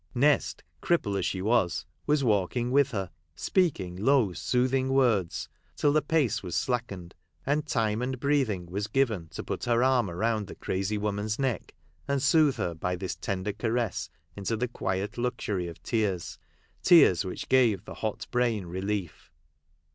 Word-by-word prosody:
Nest, 145 +4 +2 0.2
cripple 135 -13 +1
as 90 - 0
she 95 -1 -3
was, 110 -5 +1 0.2
was 150 -1 +2
walking 115 +2 +1
with 140 0 +4
her, 95 -8 -4 0.2
speaking 130 - 0
low 110 0 +3
soothing 130 +6 +1
words, 115 -10 +2 0.3
till 145 - +2
the 155 - +4
pace 145 -5 +1
was 90 -3 -5
slackened, 100 -9 -2 0.3
and 150 +2 0
time 110 -4 0
and 130 0 -2
breathing 130 -10 +1
was 100 +4 -3
given 110 -8 0
to 80 - -7
put - - -4
her 120 0 +2
arm 130 -6 +3
around 105 +3 -1
the - - -9
crazy 95 +3 -2
woman's 105 0 -2
neck, 130 -7 -2 0.3
and 140 -1 0
soothe 150 -1 +4
her 105 -7 -2
by 90 +3 -2
this 90 +1 -4
tender 100 +1 -3
caress 115 0 -1 0.3
into 100 +3 -2
the 125 +3 -1
quiet 100 -2 -3
luxury 110 -7 -2
of 85 - -10
tears; 100 -6 -1 0.4
tears 160 - +6
which 95 - -6
give 115 -7 +3
the - - -8
hot 110 -2 -4
brain 120 -5 +1
relief. 95 0 -4
110 Hz, 160 wpm, -28 LUFS, 95-130 Hz, 0.4 s, tears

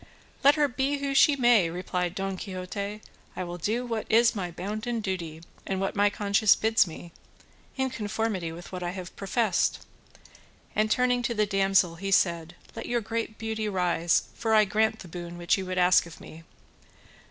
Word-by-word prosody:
"Let 285 +2 +7
her 300 -1 +3
be 270 +2 -1
who 280 0 -2
she 280 +2 +5
may," 240 -9 +4
replied 180 +1 -3
Don 195 -1 -3
Quixote, 200 +2 -6 0.3
"I - - -3
will 175 0 -6
do 225 +8 -1
what 230 -3 -3
is 230 +1 +5
my 185 -4 -3
bounden 215 +7 -4
duty, 170 -6 -4 0.2
and 190 -1 -1
what 195 0 -2
my 205 0 +4
conscience 200 0 +3
bids 220 -3 +3
me, 170 +1 -10 0.7
in 265 -1 0
conformity 210 -6 -2
with 170 +2 -10
what 185 -1 -5
I 175 - -2
have 185 -2 -8
professed;" 200 0 0 0.9
and 215 0 +2
turning 250 +2 +2
to 240 -1 -2
the 210 0 +2
damsel 195 -4 +2
he 195 +3 -4
said, 170 -3 +1 0.2
"Let - - -6
your 240 -1 0
great 225 0 -4
beauty 220 -1 -3
rise, 175 -3 +1
for 220 -1 0
I 215 -1 +6
grant 220 +2 0
the - - -10
boon 175 0 -8
which 175 -1 +2
you 190 -2 -5
would 185 0 -3
ask 180 -1 +4
of 165 - -12
me." 165 +1 -12
200 Hz, 185 wpm, -27 LUFS, 180-225 Hz, 0.9 s, Let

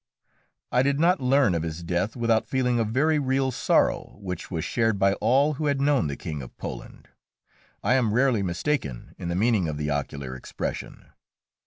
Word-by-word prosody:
I 125 - +4
did 140 +1 +1
not 175 +1 +3
learn 130 -5 +3
of 85 - 0
his 80 +1 -5
death 90 +5 -1
without 115 -2 +1
feeling 125 0 +1
a - - +3
very 145 +8 +2
real 135 -1 +1
sorrow, - - +1
which 90 -3 -6
was 80 -4 -3
shared 115 -3 +1
by 100 0 +3
all 135 +7 +3
who 150 +1 -2
had 140 -1 +1
known 140 - +2
the 70 -1 -4
King 75 -5 -5
of 60 - -11
Poland. - - -8 0.7
I 115 - +3
am 125 -5 +2
rarely 125 -1 +3
mistaken 85 - -2
in - - -5
the 85 - -2
meaning 105 -3 +2
of 75 -1 -3
the 75 0 -2
ocular 70 -2 -3
expression. 65 - -6
115 Hz, 185 wpm, -25 LUFS, 85-135 Hz, 0.7 s, I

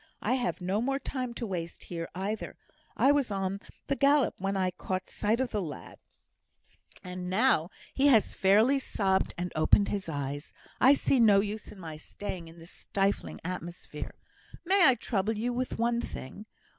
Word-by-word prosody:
I - - +2
have 245 -6 -1
no 190 +4 0
more 270 +3 0
time 255 -3 -4
to 235 - -3
waste 170 -5 -5
here, 165 -1 -5
either; 200 +4 -4 0.4
I 275 - +5
was 285 -4 +2
on 195 -1 -2 0.3
the 275 - 0
gallop 280 -3 +4
when 195 +1 -1
I 185 -1 +1
caught 185 +1 -4
sight 215 +3 0
of 260 -2 -1
the 210 - -1
lad; 155 -5 -8 1.0
and, 180 0 -5
now 190 -5 +3 0.2
he 275 +1 +3
has 230 -7 +4
fairly 220 +8 +4
sobbed 190 -7 0
and 175 +1 -3
opened 155 +6 +4
his 200 -4 -3
eyes, 145 -1 -4 0.3
I 270 +2 +7
see 275 - +2
no 210 -4 +6
use 210 +1 -3
in 200 - -12
my 160 -3 -7
staying 175 +1 -7
in 165 +1 -14
this 165 +1 -11
stifling 195 0 -2
atmosphere. 175 -1 -6 0.5
May 380 +1 +6
I 260 - +6
trouble 215 -2 -1
you 240 +3 -1
with 255 +1 -2
one 235 +1 +1
thing? 205 - -8
200 Hz, 175 wpm, -29 LUFS, 180-245 Hz, 1.0 s, I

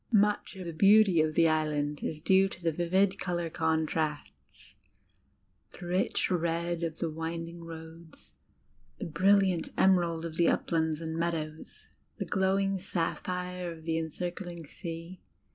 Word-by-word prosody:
Much 210 -1 +2
of 185 -1 -7
the 170 - -5
beauty 195 -1 +6
of 155 0 0
the 165 -1 +5
Island 150 -2 0
is 155 - -3
due 190 +3 +4
to 175 - -10
the 165 - +2
vivid 185 +4 +1
colour 175 -2 -2
contrasts 160 -2 -2 1.1
the - - -8
rich 180 +2 0
red 170 0 0
of 165 -1 -3
the 170 - -1
winding 165 +1 -5
roads, 160 0 -11 0.6
the - - -5
brilliant 185 +1 +3
emerald 170 -3 +3
of 165 -1 -6
the 170 - +4
uplands 160 -1 0
and 160 0 -4
meadows, 160 -2 -4 0.3
the - - -3
glowing 195 0 +1
sapphire 180 0 -3
of 160 -1 -11
the 165 0 0
encircling 175 +1 -5
sea. 165 +3 -8
170 Hz, 140 wpm, -30 LUFS, 160-180 Hz, 1.1 s, beauty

